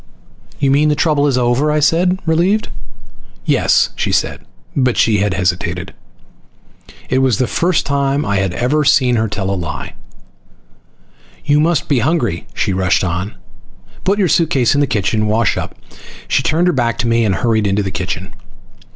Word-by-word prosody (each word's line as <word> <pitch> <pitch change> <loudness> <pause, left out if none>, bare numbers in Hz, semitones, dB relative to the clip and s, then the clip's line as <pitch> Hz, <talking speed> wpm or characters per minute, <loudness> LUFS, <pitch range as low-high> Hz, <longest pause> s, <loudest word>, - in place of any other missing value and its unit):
"You 140 -1 +1
mean 150 +2 +3
the 150 - +2
trouble 145 0 +1
is 135 -3 +1
over?" 125 +5 +1
I 150 - +1
said, 175 +5 +2
relieved. 175 +7 +1 0.8
"Yes," - - +2
she - - -2
said. - - -1 0.3
But 130 -4 +1
she 110 -3 +3
had 100 -1 0
hesitated. 90 0 -2 1.2
It 130 - +2
was 130 -6 +2
the 125 - +1
first 175 +9 0
time 140 +1 0
I 100 - 0
had 95 -1 0
ever 145 +5 +1
seen 130 -3 +3
her 110 0 0
tell 100 -1 -3
a - - 0
lie. 85 -5 -5 1.5
"You 145 +1 +3
must 165 +2 +1
be 140 -5 +2
hungry," 120 - -1
she 95 - -1
rushed 95 0 +1
on. 90 +3 -3 0.7
"Put 195 +2 +1
your 195 -3 +2
suitcase 150 -8 +2
in 145 - +1
the 145 - +2
room 110 0 0
and 105 - 0
wash 110 0 +1
up." - - -5 0.5
She - - +1
turned 165 +4 +1
her 180 - +2
back 120 -4 0
to 120 - -1
me 115 0 +2
and 100 -3 +1
hurried 110 -4 +1
into 100 +1 0
the 95 - -4
kitchen. 95 0 -5
125 Hz, 175 wpm, -16 LUFS, 100-150 Hz, 1.5 s, mean